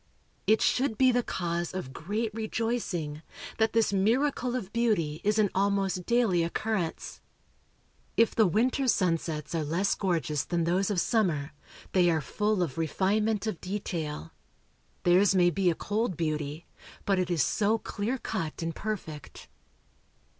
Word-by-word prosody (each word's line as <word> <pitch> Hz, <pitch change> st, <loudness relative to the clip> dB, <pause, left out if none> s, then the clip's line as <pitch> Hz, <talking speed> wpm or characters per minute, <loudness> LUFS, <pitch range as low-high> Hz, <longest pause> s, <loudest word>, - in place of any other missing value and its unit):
It 220 Hz, -, +4 dB
should 250 Hz, -4 st, +1 dB
be 260 Hz, -1 st, +5 dB
the 245 Hz, 0 st, +2 dB
cause 175 Hz, -4 st, -3 dB
of 155 Hz, -8 st, -5 dB
great 210 Hz, +8 st, -3 dB
rejoicing, 215 Hz, -9 st, -2 dB, 0.4 s
that 220 Hz, 0 st, +2 dB
this 225 Hz, -3 st, +2 dB
miracle 245 Hz, +5 st, +1 dB
of 210 Hz, -6 st, -5 dB
beauty 205 Hz, -11 st, +1 dB
is 210 Hz, +1 st, +2 dB
an 210 Hz, -3 st, +3 dB
almost 195 Hz, -2 st, 0 dB
daily 235 Hz, -8 st, +3 dB
occurrence. 175 Hz, 0 st, -3 dB, 1.0 s
If 230 Hz, 0 st, +4 dB
the 220 Hz, -3 st, +4 dB
winter 250 Hz, -, +1 dB
sunsets 165 Hz, -, 0 dB
are 165 Hz, -2 st, 0 dB
less 170 Hz, +7 st, +1 dB
gorgeous 160 Hz, -7 st, -1 dB
than 170 Hz, -1 st, -1 dB
those 185 Hz, +4 st, +1 dB
of 200 Hz, -4 st, +1 dB
summer, 170 Hz, -10 st, +1 dB, 0.4 s
they 180 Hz, -2 st, +4 dB
are 160 Hz, -2 st, +2 dB
full 210 Hz, +5 st, 0 dB
of 165 Hz, -1 st, -4 dB
refinement 205 Hz, +6 st, +1 dB
of 215 Hz, -6 st, -3 dB
detail. 165 Hz, -, -4 dB, 0.7 s
Theirs 185 Hz, +3 st, +4 dB
may 175 Hz, -1 st, +5 dB
be 190 Hz, 0 st, +2 dB
a 165 Hz, -, +1 dB
cold 205 Hz, -2 st, -2 dB
beauty, 155 Hz, -1 st, -2 dB, 0.4 s
but 195 Hz, -2 st, +2 dB
it 180 Hz, -1 st, 0 dB
is 170 Hz, -6 st, +2 dB
so 215 Hz, -, +2 dB
clear 225 Hz, +3 st, -3 dB
cut 170 Hz, -10 st, -4 dB
and 165 Hz, 0 st, -3 dB
perfect. 180 Hz, -9 st, -6 dB
190 Hz, 145 wpm, -28 LUFS, 165-220 Hz, 1.0 s, be